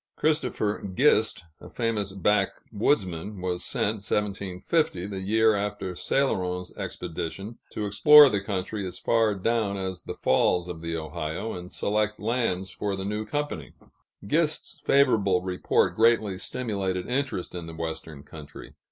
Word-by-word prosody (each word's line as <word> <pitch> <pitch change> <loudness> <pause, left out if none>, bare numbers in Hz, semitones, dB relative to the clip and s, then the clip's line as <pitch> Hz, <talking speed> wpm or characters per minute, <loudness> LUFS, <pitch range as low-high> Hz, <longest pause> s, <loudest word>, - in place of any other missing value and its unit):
Christopher 125 -9 0
Gist, 110 - +3 0.2
a - - -12
famous 110 -4 -1
backwoodsman, 100 - 0
was 90 -1 -2
sent 110 +1 0
(1750), 100 - -1
the 100 -1 -5
year 110 +3 +3
after 100 -2 -3
Céloron's 90 -6 -1
expedition, 90 +6 -5
to 105 - -2
explore 145 +9 +8
the 105 -6 0
country 100 +1 -3
as 90 - -7
far 115 -3 +2
down 105 0 0
as 95 -2 -4
the - - -7
falls 90 0 +2
of 85 -2 -6
the 85 0 -3
Ohio, 80 +6 -4
and 90 0 -8
select 105 +1 -1
lands 105 -5 -1
for 100 +1 -2
the 95 0 -4
new 105 +1 -3
company. 145 - -3 0.5
Gist's 155 +6 0
favorable 105 -10 +3
report 90 -1 +1
greatly 110 -4 +3
stimulated 95 -7 -2
interest 130 -7 -2
in 85 -2 -6
the 80 - -8
Western 80 -3 -6
country. 75 -2 -11
100 Hz, 135 wpm, -26 LUFS, 90-110 Hz, 0.5 s, explore